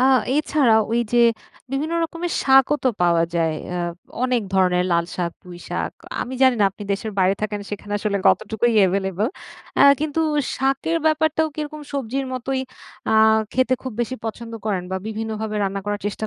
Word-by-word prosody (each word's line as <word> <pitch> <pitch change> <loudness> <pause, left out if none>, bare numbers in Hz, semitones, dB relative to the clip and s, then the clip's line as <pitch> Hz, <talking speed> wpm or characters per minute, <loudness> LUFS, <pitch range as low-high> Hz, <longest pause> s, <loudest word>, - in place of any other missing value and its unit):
আ - - +3 0.3
এছাড়া 290 -5 +3 0.2
ওই 235 - +2
যে 240 - +4 0.5
বিভিন্ন 300 +4 -1
রকমের 335 +1 -4
শাকও 270 +1 +5
তো - - +5
পাওয়া 170 -1 +4
যায়। 165 -2 +1 0.2
আ - - -2 0.5
অনেক 250 -2 +1
ধরনের 180 -1 +3
লাল 170 0 +2
শাক, 175 -2 -2
পুই 175 -1 -11
শাক। - - -2 0.3
আমি 255 - -4
জানি 260 -1 +6
না - - +6
আপনি 195 - -11
দেশের 210 +2 -3
বাইরে 190 +1 +4
থাকেন 210 -1 -2
সেখানে 205 0 -6
আসলে 205 -1 -1
কতটুকুই 230 +2 +1
এভেইলেবল। 190 +2 0 0.5
অ্যা - - +6 0.2
কিন্তু 310 +1 -1 0.4
শাকের 270 +5 0
ব্যাপারটাও 315 0 +2
কিরকম 305 0 -5
সবজির 270 0 -2
মতোই 260 +1 -2 0.5
আ - - +3 0.4
খেতে 255 0 +2
খুব 260 - -5
বেশি 240 +2 -2
পছন্দ 230 +1 -5
করেন? 195 -4 0
বা 190 - -1
বিভিন্নভাবে 220 0 -4
রান্না 195 0 -2
করার 205 0 -2
চেষ্টা 210 +1 -3
225 Hz, 170 wpm, -22 LUFS, 195-270 Hz, 0.5 s, জানি